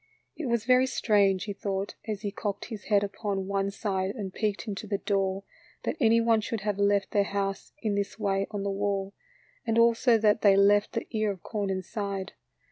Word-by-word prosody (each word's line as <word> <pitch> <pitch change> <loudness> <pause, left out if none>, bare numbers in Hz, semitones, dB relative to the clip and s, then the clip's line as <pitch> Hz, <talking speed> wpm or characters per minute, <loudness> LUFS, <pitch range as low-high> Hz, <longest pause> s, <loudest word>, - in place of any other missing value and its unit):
It 315 - -4
was 235 -2 0
very 255 +1 +5
strange, 200 -6 +2
he 205 - -4
thought, 195 0 -3
as 210 -2 -3
he 205 - -2
cocked 200 0 -4
his 215 -3 -8
head 205 -1 +3
upon 200 -1 -3
one 195 0 0
side 195 -1 -2
and 195 -5 -5
peeked 210 0 -2
into 210 +1 -5
the 200 -1 0
door, 195 -1 -1 0.4
that - - -1
any 230 -3 +5
one 230 -1 +3
should 215 0 -3
have 205 -1 -2
left 200 -1 +2
their 205 - +3
house 195 -1 -3
in 215 -2 +1
this 200 0 -2
way 195 -2 0
on 205 -1 -4
the 200 - -1
wall, 195 0 -1 0.5
and 225 -1 0
also 230 +1 +5
that 215 0 +3
they 200 -2 +6
left 205 +1 +4
the 230 - -2
ear 215 -2 0
of 190 -3 -5
corn 205 -3 -3
inside. 195 0 -3
205 Hz, 205 wpm, -28 LUFS, 195-220 Hz, 0.5 s, they